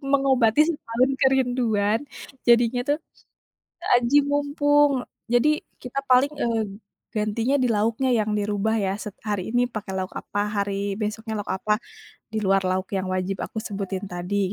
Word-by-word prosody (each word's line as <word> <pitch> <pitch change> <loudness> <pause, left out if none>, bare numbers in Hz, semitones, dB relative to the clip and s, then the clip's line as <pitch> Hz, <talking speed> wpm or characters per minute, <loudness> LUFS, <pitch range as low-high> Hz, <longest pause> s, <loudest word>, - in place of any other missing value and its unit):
Mengobati 265 -2 +4
setahun 255 -3 0
kerinduan, 245 -5 +2 0.5
jadinya 240 +1 +4
tuh 295 +2 +2 1.0
aji 245 +4 +1
mumpung. 290 -1 +3 0.3
Jadi, 245 +5 +4 0.3
kita 250 +2 -5
paling, 260 +3 +5
eee, 230 -3 +1 0.5
gantinya 225 +5 0
di 250 - +2
lauknya 225 +4 +1
yang 215 -1 0
dirubah 210 +2 0
ya. 190 -1 0
set 210 0 -7
hari 210 0 -3
ini 245 0 +2
pakai 215 -4 -6
lauk 185 0 -4
apa, 205 - -3 0.2
hari 200 0 -2
besoknya 220 +1 -3
lauk 205 - -5
apa, 210 +3 -1 0.6
di 220 - -1
luar 195 0 +4
lauk 185 +1 -1
yang 190 0 -2
wajib 185 0 -2
aku - - -21
sebutin 195 -1 -4
tadi 185 +2 -1
220 Hz, 145 wpm, -24 LUFS, 200-250 Hz, 1.0 s, paling